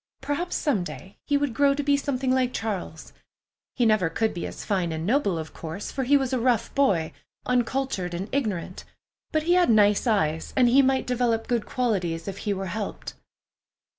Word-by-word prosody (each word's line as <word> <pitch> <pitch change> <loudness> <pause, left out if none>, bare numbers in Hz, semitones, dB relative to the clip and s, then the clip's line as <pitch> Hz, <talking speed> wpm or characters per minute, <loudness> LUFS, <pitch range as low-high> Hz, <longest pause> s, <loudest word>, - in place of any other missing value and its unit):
Perhaps 290 +6 -2
some 250 - 0
day 190 +2 -10
he 290 - +3
would 285 -4 -1
grow 280 +3 +3
to 290 - -2
be 285 0 +3
something 270 -2 -1
like 255 -1 +1
Charles. 195 -7 -4 0.6
He 245 - +2
never 215 -6 +3
could 220 +7 0
be 175 - -4
as - - -8
fine 185 -5 0
and 160 0 -3
noble, 210 - +1
of 160 -1 -6
course, 165 +5 -6
for 265 - -2
he 285 +3 +5
was 265 -1 -2
a 255 - +1
rough 235 -2 +1
boy, 195 - +2 0.3
uncultured 250 -7 -1
and 190 +4 -4
ignorant; 205 -10 -2 0.5
but 310 -1 +1
he 345 +2 +3
had 360 -4 +4
nice 210 +1 +4
eyes, 160 -8 0
and 250 -2 +5
he 265 +3 +6
might 265 0 +2
develop 240 -2 0
good 240 -3 -1
qualities 185 -10 -1
if 195 0 -5
he 210 - -2
were 195 -1 -2
helped. 200 +3 -5
230 Hz, 195 wpm, -25 LUFS, 190-270 Hz, 0.6 s, he